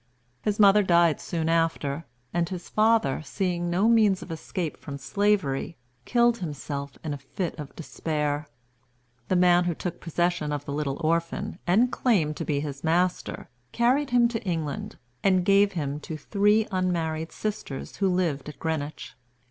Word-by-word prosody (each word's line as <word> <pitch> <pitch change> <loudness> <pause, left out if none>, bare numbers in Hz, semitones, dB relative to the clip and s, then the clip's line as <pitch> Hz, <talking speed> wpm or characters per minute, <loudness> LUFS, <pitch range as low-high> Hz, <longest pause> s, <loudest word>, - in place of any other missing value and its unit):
His 210 0 -1
mother 205 0 +7
died 170 -4 +3
soon 165 -2 -2
after, 165 -2 0 0.3
and 170 0 0
his 180 -2 -6
father, 215 -11 +3
seeing 175 +3 -2
no 185 +5 +2
means 215 -5 +4
of - - -9
escape 165 0 -4
from 140 -2 -7
slavery, 160 0 0 0.3
killed 240 -1 +3
himself 140 -4 -5
in 155 -2 -2
a 145 - -6
fit 165 +5 -4
of 145 -2 -8
despair. 150 -2 -2 0.8
The 185 - +1
man 175 0 +5
who 175 -2 0
took 175 +1 -5
possession 170 -2 0
of 145 -1 -3
the 140 - -4
little 145 -1 -2
orphan, 165 +2 -1
and 225 +8 +4
claimed 190 - +1
to - - -3
be 145 -2 0
his 140 -2 -6
master, 175 +3 0 0.3
carried 260 +4 +2
him 245 -2 +5
to 225 -2 -3
England, 160 -7 -3 0.3
and 185 -2 +3
gave 200 +1 +4
him 145 -4 -2
to 155 +1 -6
three 210 +6 +2
unmarried 165 -4 -1
sisters 205 -10 -5
who 195 -1 +2
lived 165 -6 0
at 150 - -10
Greenwich. 155 -2 -4
170 Hz, 160 wpm, -26 LUFS, 150-195 Hz, 0.8 s, mother